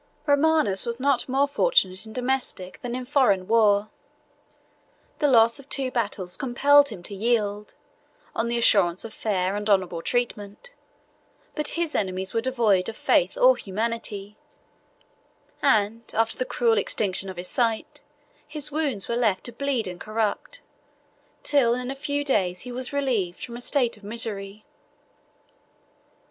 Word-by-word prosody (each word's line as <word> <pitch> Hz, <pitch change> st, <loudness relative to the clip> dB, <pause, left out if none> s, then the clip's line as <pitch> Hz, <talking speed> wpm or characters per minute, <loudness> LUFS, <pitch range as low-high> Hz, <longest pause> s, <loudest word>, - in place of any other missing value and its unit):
Romanus 285 Hz, -9 st, +2 dB
was 235 Hz, 0 st, -4 dB
not 275 Hz, -1 st, +1 dB
more 275 Hz, +2 st, +2 dB
fortunate 225 Hz, -, +3 dB
in -, -, -10 dB
domestic 250 Hz, -7 st, -3 dB
than 245 Hz, 0 st, -4 dB
in 255 Hz, 0 st, -5 dB
foreign 245 Hz, -9 st, +2 dB
war: 215 Hz, -2 st, +3 dB, 1.3 s
the 295 Hz, -, +3 dB
loss 230 Hz, -1 st, +4 dB
of 280 Hz, +1 st, -15 dB
two 265 Hz, -2 st, 0 dB
battles 200 Hz, -7 st, -2 dB
compelled 285 Hz, +2 st, +4 dB
him 190 Hz, -7 st, -9 dB
to 200 Hz, -, -7 dB
yield, 210 Hz, -1 st, -1 dB, 0.6 s
on 225 Hz, -, 0 dB
the 235 Hz, 0 st, -1 dB
assurance 195 Hz, -6 st, +3 dB
of 220 Hz, -, -9 dB
fair 195 Hz, -3 st, -1 dB
and 210 Hz, +1 st, -3 dB
honorable 185 Hz, -4 st, +1 dB
treatment; 240 Hz, -, -3 dB, 0.8 s
but 300 Hz, -1 st, -2 dB
his 335 Hz, -2 st, -1 dB
enemies 190 Hz, -1 st, -1 dB
were 230 Hz, -, +1 dB
devoid 225 Hz, -7 st, +1 dB
of 225 Hz, -, -8 dB
faith -, -, +2 dB
or -, -, +6 dB
humanity; 210 Hz, 0 st, -4 dB, 1.3 s
and, 220 Hz, -4 st, +2 dB
after 225 Hz, 0 st, +1 dB
the 255 Hz, -, -2 dB
cruel 235 Hz, -3 st, +2 dB
extinction 195 Hz, -2 st, -1 dB
of 185 Hz, -, -8 dB
his 180 Hz, +1 st, -5 dB
sight, 230 Hz, -1 st, -1 dB, 0.5 s
his 300 Hz, -1 st, +1 dB
wounds 280 Hz, -10 st, -1 dB
were 235 Hz, -, -1 dB
left 220 Hz, -6 st, +1 dB
to 240 Hz, -, -5 dB
bleed 260 Hz, -2 st, -1 dB
and 180 Hz, -1 st, -8 dB
corrupt, 220 Hz, -, -2 dB, 0.8 s
till 250 Hz, -5 st, +3 dB
in 250 Hz, +1 st, -4 dB
a -, -, -5 dB
few 285 Hz, +1 st, -2 dB
days 185 Hz, -10 st, 0 dB
he 250 Hz, -, -8 dB
was 255 Hz, +1 st, -4 dB
relieved 240 Hz, -11 st, -1 dB
from 235 Hz, -, -9 dB
a 240 Hz, -, -7 dB
state 245 Hz, -4 st, +1 dB
of 210 Hz, -, -20 dB
misery. 210 Hz, -2 st, -3 dB
230 Hz, 150 wpm, -25 LUFS, 200-265 Hz, 1.3 s, or